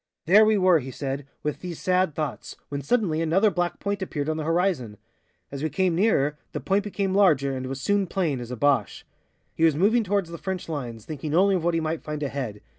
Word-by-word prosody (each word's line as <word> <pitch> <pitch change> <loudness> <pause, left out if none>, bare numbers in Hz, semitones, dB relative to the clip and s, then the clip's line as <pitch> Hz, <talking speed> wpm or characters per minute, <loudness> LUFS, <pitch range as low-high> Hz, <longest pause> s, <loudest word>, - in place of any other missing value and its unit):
"There 200 +6 +7
we 215 -1 +3
were," 185 -3 +5
he 130 -1 -7
said, 135 +1 -4 0.2
"with 150 -1 -2
these 175 -3 -7
sad 185 -4 +1
thoughts, 150 -4 -4
when 140 0 -3
suddenly 165 - +1
another 190 +6 +3
black 175 -1 -2
point 200 0 -2
appeared 155 -5 -3
on 155 - -1
the 155 - -3
horizon. 165 - 0 0.5
As 140 -1 -6
we 155 - 0
came 180 +4 +1
nearer, 150 -6 +2
the - - -2
point 195 +1 +1
became 200 -2 -2
larger 150 -9 +3
and 130 0 -4
was 135 +1 -5
soon 205 +2 +1
plain, 165 -8 -1
as 120 -1 -7
a 125 - -5
Boche. 145 +2 +1 0.5
He 165 - -2
was 160 -3 +5
moving 215 +8 +3
towards 195 -3 -1
the 170 - -7
French 190 -2 -4
lines, 120 -8 -5
thinking 150 0 -4
only 195 +3 +4
of 180 -3 0
what 170 0 +1
he - - +2
might 160 0 -2
find 150 -1 -5
ahead. 130 -7 -4
165 Hz, 225 wpm, -25 LUFS, 140-190 Hz, 0.5 s, There